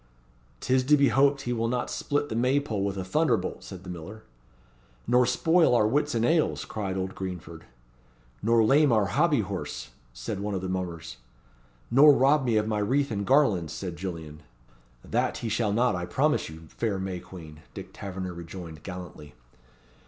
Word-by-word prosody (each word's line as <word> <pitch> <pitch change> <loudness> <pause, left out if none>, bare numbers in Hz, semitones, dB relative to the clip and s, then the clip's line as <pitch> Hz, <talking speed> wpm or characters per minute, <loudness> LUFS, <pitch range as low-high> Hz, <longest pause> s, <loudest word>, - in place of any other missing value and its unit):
"'Tis 130 0 +2
to 150 +3 +4
be 140 -2 +4
hoped 140 +3 +3
he 120 -2 -2
will 115 -1 -1
not 125 +1 -1
split 145 0 -2
the 110 - -5
May 130 +4 +2
pole 110 -9 -3
with 100 -1 -2
a 95 - -3
thunderbolt," 95 - 0
said 95 -1 -10
the 90 - -9
miller. 95 +6 -9 0.8
"Nor 125 +1 +3
spoil 165 -5 +3
our 110 - +4
Whitsun 125 -2 +1
ales," 160 +1 +1
cried 95 -3 -4
old 95 0 -3
Greenford. 85 -3 -7 0.8
"Nor 115 +1 +3
lame 140 +5 +4
our 110 -3 +3
Hobby 150 +3 +2
horse," 95 - -6 0.2
said - - -5
one 100 0 -3
of 95 - -2
the 95 - -4
mummers. 85 -9 -4 0.7
"Nor 145 +4 +8
rob 135 +2 +3
me 115 -3 +2
of 105 0 +1
my 105 -1 0
wreath 130 +6 +1
and 100 -2 -3
garlands," 110 - +3
said 90 -3 -5
Gillian. 80 -4 -7 0.6
"That - - 0
he 115 - -4
shall 110 -1 0
not, 115 0 +2
I 90 0 -4
promise 150 - +1
you, 80 +1 -11
fair 110 -4 -2
May 95 -1 -4
Queen!" 80 -5 -12 0.2
Dick - - -9
Tavernor 95 -2 -6
rejoined, 85 -2 -9
gallantly. 90 -5 -9
105 Hz, 175 wpm, -27 LUFS, 90-130 Hz, 0.8 s, Nor